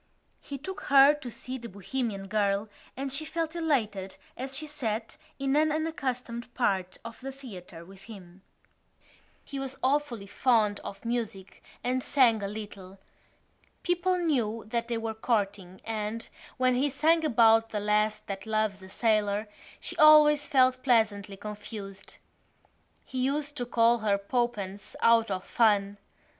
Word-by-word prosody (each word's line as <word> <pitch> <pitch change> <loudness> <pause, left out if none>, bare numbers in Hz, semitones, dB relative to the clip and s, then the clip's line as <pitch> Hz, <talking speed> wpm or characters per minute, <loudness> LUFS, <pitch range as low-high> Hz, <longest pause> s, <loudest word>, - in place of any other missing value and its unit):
He 280 - -7
took 380 +8 -7
her 275 +1 +7
to 295 -4 -7
see 255 +3 -7
The 235 0 -8
Bohemian 200 +1 -4
Girl 205 0 0 0.3
and 270 0 -3
she 295 +3 -2
felt 325 +1 -3
elated 215 - -1 0.2
as 265 +1 -5
she 310 - -4
sat 230 -7 -4 0.2
in 275 0 0
an 310 +1 +3
unaccustomed 255 -7 -3
part 190 -6 0
of 230 0 -8
the 270 +1 -5
theatre 185 -11 -11
with 195 +1 -15
him. 190 -4 -12 1.0
He 275 - -6
was 270 0 -3
awfully 260 -6 0
fond 215 -2 +2
of 195 - -9
music 225 -5 -4 0.2
and 255 +1 0
sang 245 -6 +3
a 200 - -2
little. 200 -2 -8 0.9
People 360 +1 +1
knew 240 -10 0
that 235 0 -1
they 235 -1 -1
were 225 0 -3
courting 200 -5 -2
and, 220 0 -3 0.3
when 255 -1 +3
he 265 +4 +2
sang 320 +4 +2
about 225 -5 +5
the 210 - -2
lass 210 +1 +1
that 195 0 -7
loves 215 -3 0
a 190 - -12
sailor, 210 -1 +1 0.3
she - - -6
always 300 -1 +7
felt 255 -3 +3
pleasantly 215 -6 +1
confused. 205 -1 -8 0.9
He 260 - -5
used 285 +3 -1
to 245 -2 -3
call 235 0 +3
her 210 -2 +2
Poppens 205 -2 -3
out 230 -1 +5
of 190 -1 -2
fun. 205 -3 +2
230 Hz, 150 wpm, -28 LUFS, 205-270 Hz, 1.0 s, her